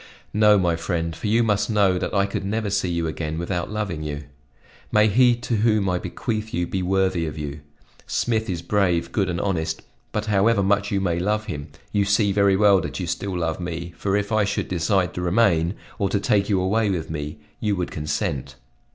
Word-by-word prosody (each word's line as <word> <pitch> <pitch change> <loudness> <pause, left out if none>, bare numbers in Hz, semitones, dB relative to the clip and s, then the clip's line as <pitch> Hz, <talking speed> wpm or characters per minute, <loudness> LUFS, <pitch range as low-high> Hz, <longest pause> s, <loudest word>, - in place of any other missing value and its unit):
"No, 105 0 +5
my 90 -3 +2
friend, 85 -1 -2
for - - -4
you 115 +3 +3
must 105 -1 +1
know 100 -4 +3
that - - -2
I 100 -1 +2
could 100 - -3
never 105 +1 -2
see 100 -2 0
you 85 -1 -1
again 80 0 -3
without 85 +1 -2
loving 105 -7 -3
you. 75 -1 -4 0.7
May 105 0 +5
he 120 +3 +5
to 120 -1 -2
whom 105 -2 +2
I 90 -1 +1
bequeath 110 0 -3
you 85 0 0
be 95 +2 -2
worthy 95 -2 +1
of 75 - -6
you! 75 0 -5 0.5
Smith 110 -2 0
is 85 -3 -3
brave, 90 -2 +1
good 100 -3 0
and 85 -1 -2
honest, 80 -5 -1 0.3
but 105 0 -2
however 105 0 +3
much 100 +1 +2
you 100 -1 0
may 85 -3 0
love 105 +4 0
him, 75 -9 -5 0.2
you 100 - +2
see 100 +1 +2
very 100 -1 +4
well 100 -1 +5
that 75 -1 -5
you 90 - -2
still 90 +2 -3
love 80 -1 -1
me, 85 -1 -5
for 100 +3 0
if 100 +1 -2
I 110 -1 +3
should 100 0 -2
decide 90 +1 +1
to 90 - -4
remain, 90 -2 +2 0.2
or 100 -2 +1
to 100 - +1
take 100 0 +1
you 100 -3 +3
away 105 +4 +1
with 85 -5 -2
me, 75 -1 -4 0.2
you 105 -2 0
would 90 -2 -3
consent." 75 -3 -3
95 Hz, 210 wpm, -23 LUFS, 85-105 Hz, 0.7 s, No